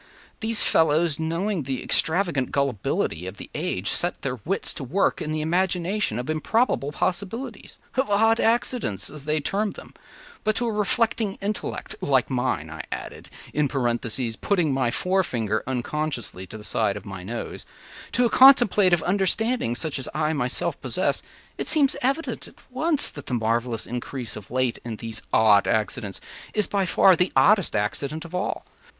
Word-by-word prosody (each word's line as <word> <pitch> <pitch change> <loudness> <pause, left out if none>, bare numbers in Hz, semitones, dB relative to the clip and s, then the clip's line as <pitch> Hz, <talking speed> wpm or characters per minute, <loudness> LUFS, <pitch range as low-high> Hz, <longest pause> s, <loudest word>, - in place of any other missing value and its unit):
These 225 -1 +3
fellows, 160 0 +3
knowing 170 +4 -1
the 130 -1 -4
extravagant 165 -6 +3
gullibility 110 - -1
of 95 +2 -7
the - - -10
age, 95 +3 -2
set 175 +1 +1
their 130 -2 -3
wits 195 +5 -1
to 145 - -6
work 175 +11 0
in 155 - -3
the 155 0 -1
imagination 180 - 0
of 125 +2 -4
improbable 155 - 0
possibilities— 205 - -3 0.2
of 265 -1 +1
odd 225 +3 +3
accidents, 230 - 0
as 150 -1 -8
they 155 +1 +1
term 200 +7 -1
them; - - -12 0.5
but 215 0 +1
to 240 - +2
a 230 - 0
reflecting 210 0 0
intellect 205 +1 -3
(like 135 -2 +1
mine,” 125 -11 -1
I 80 - -6
added, - - -7 0.2
in 150 -1 +2
parenthesis, 120 -3 -1
putting 170 - +1
my 130 -3 +1
forefinger 120 - 0
unconsciously 130 -6 -3
to 110 - -9
the 105 - -11
side 105 0 0
of - - -10
my 95 -2 -7
nose,) 115 +6 -6 0.5
“to 245 - +3
a - - +3
contemplative 210 - +6
understanding 200 - +1
such 150 +1 -2
as 130 - -2
I 155 0 +1
myself 125 -4 -1
possess, - - 0 0.4
it - - -2
seems 290 -4 +4
evident 275 +6 -1
at - - -20
once 300 +3 +2
that 145 - -10
the 125 - -1
marvelous 115 0 -1
increase 125 0 -4
of 105 -1 -10
late 130 -1 0
in 115 -2 -5
these 110 -1 -3
‘odd 105 -2 +5
accidents’ 110 -1 -1 0.4
is 210 -2 +3
by 195 -2 -1
far 190 +1 +5
the 180 +2 +1
oddest 205 -4 +4
accident 140 +10 -2
of 170 - -11
all. 180 +3 -2
155 Hz, 165 wpm, -24 LUFS, 120-200 Hz, 0.5 s, contemplative